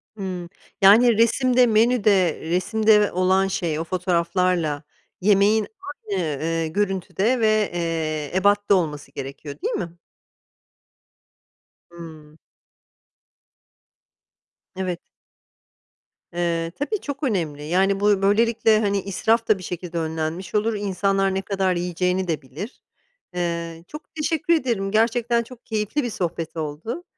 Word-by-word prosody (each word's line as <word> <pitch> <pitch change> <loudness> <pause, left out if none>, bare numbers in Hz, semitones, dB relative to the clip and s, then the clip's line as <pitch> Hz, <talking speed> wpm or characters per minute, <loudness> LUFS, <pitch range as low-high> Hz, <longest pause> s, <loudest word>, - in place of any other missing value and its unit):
Hımm. 185 -4 -5 0.3
Yani, 220 +4 +6
resimde, 245 +2 +4
menüde, 215 -6 +3
resimde 210 +6 +3
ve 205 - +1
olan 190 +1 +2
şey, 165 -5 -2
o 165 - -1
fotoğraflarla 175 -3 0 0.4
yemeğin 205 +2 +3 0.4
aynı, 185 -3 0
ııı, 160 +2 -2
görüntüde 195 +6 0
ve, 215 -2 +2
eee, 160 -3 -2
ebatta 205 +1 +3
olması 150 -6 -2
gerekiyor, 140 +2 -7
değil - - -1
mi? 170 -3 -4 1.9
Hımm. 160 -3 -12 2.4
Evet. 185 -2 -3 1.3
Eee, 170 -1 -1
tabii 385 +9 -2
çok 285 0 -6
önemli, 165 - -1
yani, 190 +5 +1
buy 205 -1 +3
böylelikle, 220 +2 +3
hani, 200 -2 0
israf 220 +4 0
da 215 - +4
bir 185 - -10
şekilde 175 -1 -5
önlenmiş 160 +4 -4
olur, 220 +2 +1
insanlar 195 -1 0
ne 190 - 0
kadar 190 -2 0
yiyeceğini 180 +1 -1
de 160 -3 -1
bilir. 155 - -9 0.5
Eee, 170 -1 -3
çok 300 +1 -11
teşekkür 320 +1 0
ederim, 235 -11 0
gerçekten 235 +2 +2
çok 245 0 -15
keyifli 220 +6 -1
bir 240 - -2
sohbet 170 -5 -4
oldu. 160 - -5
190 Hz, 115 wpm, -23 LUFS, 170-215 Hz, 2.4 s, Yani